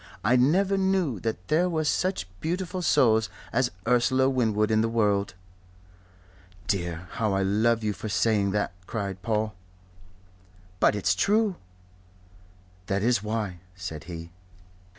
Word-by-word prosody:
I 115 +5 +4
never 190 +10 +3
knew 190 - +1
that 100 -4 -4
there 175 +4 +2
were 160 -2 0
such 180 - 0
beautiful 180 +2 -3
souls 110 -9 +3 0.2
as 120 +1 +2 0.2
Ursula 130 +2 +3
Winwood 110 -4 +1
in 110 0 +3
the 115 - +1
world." 105 -4 +1 1.3
"Dear, 85 -2 -2
how 110 -3 -1
I 95 0 +1
love 110 +4 +2
you 105 -1 0
for 110 +4 -6
saying 105 -1 +2
that!" 105 -1 -1 0.2
cried 100 -4 -4
Paul. 110 0 -1 1.3
"But - - +4
it's 95 -2 +2
true." 205 - +2 1.3
"That 100 -1 0
is 120 -3 +2
why," 105 -4 -3 0.2
said 90 -5 -7
he. 85 -1 -8
110 Hz, 130 wpm, -26 LUFS, 100-130 Hz, 1.3 s, I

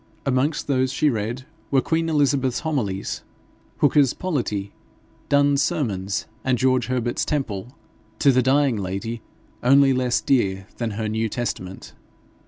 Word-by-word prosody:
Amongst 135 +3 +1
those 130 -2 +1
she 145 +2 +2
read 115 +3 -3 0.2
were 135 - +3
Queen 165 +4 0
Elizabeth's 140 -4 +1
Homilies, 115 - -2 0.6
Hooker's 145 -3 +4
Politie, 115 - -2 0.6
Donne's 140 0 +4
Sermons, 100 - -1 0.2
and 130 -1 +1
George 130 0 +2
Herbert's 125 -1 -1
Temple, 125 -5 -3 0.4
to 140 - +5
the 130 0 +3
dying 135 -1 +2
lady 100 +4 -4 0.4
only 135 +2 +5
less 125 -1 +1
dear 95 -7 +1
than 115 -3 -2
her 110 -1 -2
New 110 +1 -1
Testament. 95 -5 -5
130 Hz, 130 wpm, -23 LUFS, 110-140 Hz, 0.6 s, to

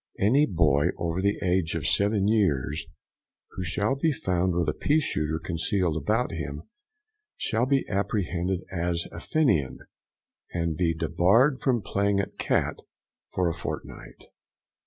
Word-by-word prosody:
Any 130 +9 +4
boy 75 -5 +3
over 85 +2 -2
the 100 +1 +1
age 90 -3 +1
of 80 -3 -3
seven 100 +4 +2
years, 80 - +1 0.6
who 95 - -5
shall 100 +8 0
be 155 +4 +1
found 90 - 0
with 85 -2 +1
a - - +1
pea 150 +2 +2
shooter 80 - -1
concealed 85 0 0
about 110 +9 0
him, 75 -3 -5 0.7
shall 120 +1 0
be 135 -1 +1
apprehended 95 -2 -1
as 85 -1 -1
a 85 - -8
Fenian, 85 - +1 0.7
and 85 -2 -1
be 85 0 +1
debarred 95 - +3
from 120 -6 +1
playing 100 0 +1
at 100 - -4
cat - - 0 0.5
for 90 -1 0
a 85 - 0
fortnight. - - -7
90 Hz, 140 wpm, -26 LUFS, 85-105 Hz, 0.7 s, Any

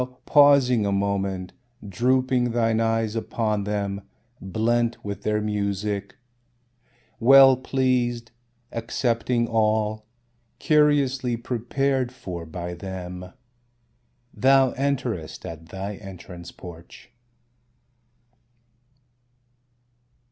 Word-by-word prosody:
pausing 140 -6 +5
a 100 - 0
moment, 100 -2 -1 0.3
drooping 125 +4 +1
thine 115 -1 +1
eyes 115 -1 0
upon 110 -2 -1
them, 100 -1 -2 0.4
blent 115 +4 0
with 100 -1 -5
their 105 0 0
music, 100 -1 -2 1.0
Well 135 +2 +8
pleased, 125 -3 -1 0.4
accepting 120 0 -1
all, 110 -1 0 0.5
curiously 140 -5 +2
prepared 125 +2 -1
for 90 -9 -7
by 85 +2 -6
them, 90 0 -7 1.0
Thou 135 0 +4
enterest 125 - -3
at 80 0 -9
thy 95 +2 -6
entrance 90 -3 -10
porch. 85 +3 -13
110 Hz, 80 wpm, -24 LUFS, 100-125 Hz, 1.0 s, Well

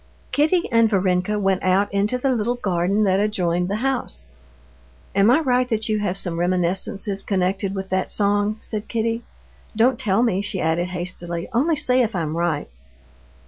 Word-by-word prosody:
Kitty 320 +4 +2
and 230 -1 +4
Varenka 185 0 +1
went 195 -2 +1
out 190 +2 +1
into 205 +5 +1
the 265 +2 0
little 240 0 0
garden 195 -1 0
that 190 -1 +2
adjoined 180 -4 0
the 200 - -1
house. 245 - -2 0.9
"Am 200 +2 +4
I 260 +6 +5
right, 250 -3 +1
that 220 -1 0
you 215 -1 +1
have 195 -2 -1
some 175 -3 +1
reminiscences 185 +3 0
connected 190 0 -1
with 190 0 -5
that 185 0 -1
song?" 205 +1 +1
said 215 -1 -6
Kitty. 230 0 -1 0.5
"Don't 240 +4 +3
tell 205 +3 +2
me," 195 -5 +1
she 200 -2 -3
added 165 +2 0
hastily, 175 -1 -5
"only 300 +8 +2
say 255 -3 +2
if 225 -4 -1
I'm 160 -3 -2
right." 170 -3 -1
200 Hz, 170 wpm, -22 LUFS, 180-230 Hz, 0.9 s, I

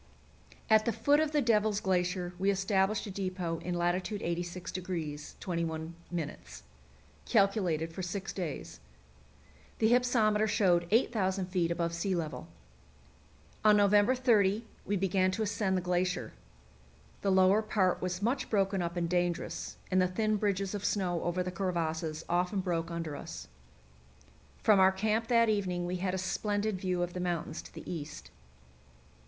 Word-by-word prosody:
At 220 -1 +5
the 235 - +2
foot 285 +7 +3
of 310 -1 +1
the 295 -2 +2
Devil's 215 -3 +2
Glacier 180 -2 0
we 195 +1 +2
established 195 +1 +1
a 205 - -6
depot 185 -3 -3
in 180 0 -3
lat. 175 0 +2
86° 175 -4 -4
21', 165 -2 -3 1.3
calculated 175 - +1
for 185 - -5
six 190 +2 -4
days. 170 - -5 1.0
The 220 0 +3
hypsometer 225 -4 +3
showed 175 -5 +2
8,000 200 -4 +1
feet 180 -3 +1
above 170 0 -1
sea 185 +3 -1
level. 160 -3 -4 1.2
On 210 -1 +6
November 205 +4 +4
30 225 -4 +3 0.2
we 205 - +1
began 185 0 +2
to 210 +4 -1
ascend 200 -2 0
the - - 0
glacier. 180 +1 -1 0.9
The 195 - +1
lower 190 +2 +5
part 200 -4 +1
was 180 +1 -3
much 255 +4 0
broken 195 -2 +1
up 170 0 -3
and 170 -1 0
dangerous, 175 0 -2
and 185 0 +4
the 185 - +3
thin 215 +4 0
bridges 195 -1 -1
of 205 -1 -4
snow 180 -5 0
over 175 +1 -1
the 180 - -4
crevasses 165 -4 -2
often 180 +3 +1
broke 170 -3 -2
under 165 -3 -4
us. - - -8 1.1
From 210 -3 +5
our 190 0 +6
camp 215 +4 0
that 230 -1 +4
evening 185 -5 0
we 180 +1 -2
had 185 +1 -1
a - - -1
splendid 205 +1 -1
view 180 -2 0
of 175 0 -4
the 180 - -4
mountains 175 -3 -2
to - - -14
the - - -10
east. 160 -5 -6
185 Hz, 150 wpm, -31 LUFS, 175-210 Hz, 1.3 s, On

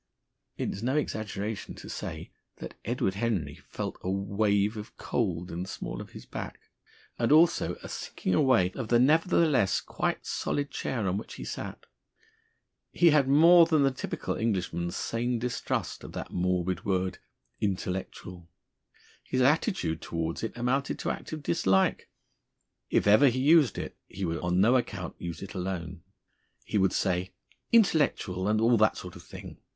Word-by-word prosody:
It - - -2
is 100 - -6
no 130 +4 0
exaggeration 110 -6 -3
to - - -11
say - - -6 0.2
that - - -8
Edward 95 - 0
Henry 95 -9 -1 0.2
felt - - -5
a 95 - -3
wave 100 +2 +1
of 105 0 -9
cold 90 -7 -2
in 85 - -4
the 95 - -5
small - - -5
of - - -10
his - - -10
back, - - -7 0.6
and 115 +2 +1
also 160 +3 +4
a - - -6
sinking 95 - -3
away 115 -8 +4
of 120 0 -5
the 120 - +4
nevertheless 150 - +3
quite - - -3
solid 145 0 -2
chair 115 -6 -2
on 95 +1 0
which - - -9
he - - -7
sat. - - -6 1.1
He 170 -2 +5
had 145 -3 +4
more 165 +4 +7
than 155 -3 +3
the 135 - +3
typical 130 - -4
Englishman's 90 -5 -1
sane 120 +4 -1
distrust 115 -1 -3
of - - -9
that - - -6
morbid 90 0 -1
word 95 -1 -1 0.4
"Intellectual." 95 -2 -4 0.7
His 130 - -1
attitude 135 - +1
towards 85 0 -3
it 115 - -4
amounted 130 +3 0
to - - -2
active 155 -2 -6
dislike. 95 -7 +1 0.8
If - - +2
ever 105 +8 +6
he 125 0 +1
used 150 0 +5
it, - - -5
he 95 +1 -4
would 80 -1 -2
on 90 +1 0
no 115 +6 +5
account 95 -8 -4
use 85 +1 -6
it 100 - -8
alone; 90 -2 -4 0.6
he 105 - 0
would 95 0 +3
say, 90 +1 -1 0.4
"Intellectual, 145 - +2
and 110 +1 +2
all 115 +1 +4
that 110 -1 +3
sort 90 +1 -8
of 90 - -10
thing!" - - -11
105 Hz, 160 wpm, -28 LUFS, 90-130 Hz, 1.1 s, more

